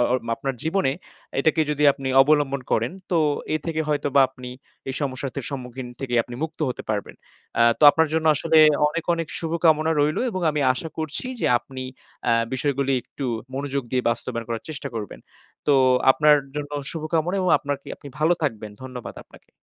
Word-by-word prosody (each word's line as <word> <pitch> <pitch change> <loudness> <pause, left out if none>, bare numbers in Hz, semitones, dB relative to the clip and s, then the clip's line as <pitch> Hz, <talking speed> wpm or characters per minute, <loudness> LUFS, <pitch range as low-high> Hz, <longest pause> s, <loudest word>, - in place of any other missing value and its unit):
আ - - +5 0.3
আপনার 135 -1 -3
জীবনে 160 -4 +1 0.5
এটাকে 160 0 +2
যদি 150 0 +1
আপনি 135 -1 -5
অবলম্বন 145 -2 +2
করেন, 115 +7 +1 0.2
তো 170 - +3 0.4
এ - - +3
থেকে 160 -1 -1
হয়তোবা 145 -2 +2
আপনি 125 -1 -10 0.4
এই 130 - -3
সমস্যাটার 135 -1 -4
সম্মুখীন 125 -2 -6
থেকে 130 -3 -3
আপনি 120 - -10
মুক্ত 160 0 -5
হতে 125 - -5
পারবেন। 105 -1 -3 0.4
অ্যা 115 - +5
তো - - -6
আপনার 160 +1 +2
জন্য 160 0 +1
আসলে 160 +1 +3 0.3
অনেক, 170 +2 -4
অনেক 165 -2 -4
শুভকামনা 160 -1 +2
রইলো 150 +1 +1
এবং 185 -2 -3
আমি 150 -1 -2
আশা 160 - -5
করছি 155 - -3
যে - - +1
আপনি 130 0 -8 0.4
অ্যা 115 - +3 0.2
বিষয়গুলি 135 0 0
একটু 135 - -6 0.3
মনোযোগ 140 0 -2
দিয়ে 125 -1 +1
বাস্তবায়ন 115 0 -4
করার 115 -1 -3
চেষ্টা 155 - -5
করবেন। 105 -3 -6 0.5
তো 145 - +5 0.4
আপনার 150 +2 +5 0.2
জন্য 145 0 -4 0.2
শুভকামনা 165 +3 -1
এবং 185 - +1
আপনারকি 140 -1 -5
আপনি 140 - -11
ভালো 160 +3 +3
থাকবেন। 110 -7 -2
ধন্যবাদ 125 -2 -7
আপনাকে। - - -20
145 Hz, 170 wpm, -23 LUFS, 130-155 Hz, 0.5 s, আ